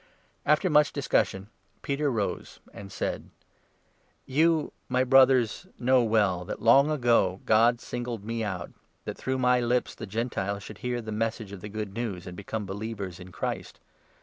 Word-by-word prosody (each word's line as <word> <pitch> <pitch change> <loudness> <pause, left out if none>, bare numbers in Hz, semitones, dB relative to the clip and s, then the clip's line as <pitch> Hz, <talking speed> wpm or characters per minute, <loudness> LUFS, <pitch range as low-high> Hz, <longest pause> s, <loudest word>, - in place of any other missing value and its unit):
After 150 +5 +4
much 150 -3 +4
discussion, 95 +1 0 0.4
Peter 140 +1 -1
7 135 -4 +1
rose 105 -3 -3
and 100 -1 -10
said: - - -3 1.0
"You, 160 +3 +2 0.2
my 130 0 +2
Brothers, 130 +2 +4
know 130 +1 +4
well 105 -6 +2
that 105 - -5
long 135 +6 +5
ago 120 -10 +2
God 115 +2 +4
singled 120 -3 -5
me 115 0 -2
out 95 -5 -4 0.2
— - - -42
that - - -4
through 130 0 -2
my 125 -1 +3
lips 120 +1 0
the 110 - -8
Gentiles 100 -2 -2
should 105 0 -10
hear 120 -1 -3
the 110 - -6
Message 110 -1 -2
of 100 -3 -8
the 105 - -7
Good 105 -1 -5
News, 105 -6 -4
and 90 - -8
become 105 +2 -5
believers 100 -2 -5
in 90 0 -11
Christ. - - -4
115 Hz, 170 wpm, -27 LUFS, 100-125 Hz, 1.0 s, long